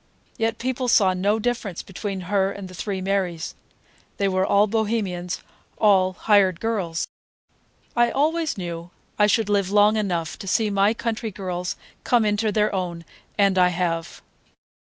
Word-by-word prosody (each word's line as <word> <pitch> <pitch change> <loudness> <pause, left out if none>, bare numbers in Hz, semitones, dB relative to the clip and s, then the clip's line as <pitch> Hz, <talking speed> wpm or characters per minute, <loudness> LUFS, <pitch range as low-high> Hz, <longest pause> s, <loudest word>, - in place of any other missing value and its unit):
Yet 225 0 -1
people 255 0 -2
saw 195 -5 +4
no 200 +4 +1
difference 220 -5 -2
between 195 0 -5
her 195 +1 +1
and 200 -1 -7
the 185 - -12
three 190 +2 -4
Marys; 185 -4 -1 0.6
they 200 - +1
were 185 -1 +1
all 200 +2 +4
Bohemians, 205 -5 -2 0.3
all 190 -3 +4
"hired 190 -2 +3
girls." 195 -8 -2 0.9
I 240 0 +4
always 310 +3 0
knew 170 -2 -5 0.3
I 210 - +6
should 220 0 +2
live 200 -2 +1
long 210 +1 +4
enough 175 -6 -2
to 195 - -8
see 215 +2 +1
my 200 +3 +3
country 225 -1 -3
girls 180 -3 -4 0.3
come 240 -3 +3
into 210 +1 +1
their 210 0 +1
own, 175 -3 -3 0.3
and 195 -2 +3
I 180 - +6
have. 170 -2 -2
200 Hz, 150 wpm, -23 LUFS, 185-220 Hz, 0.9 s, I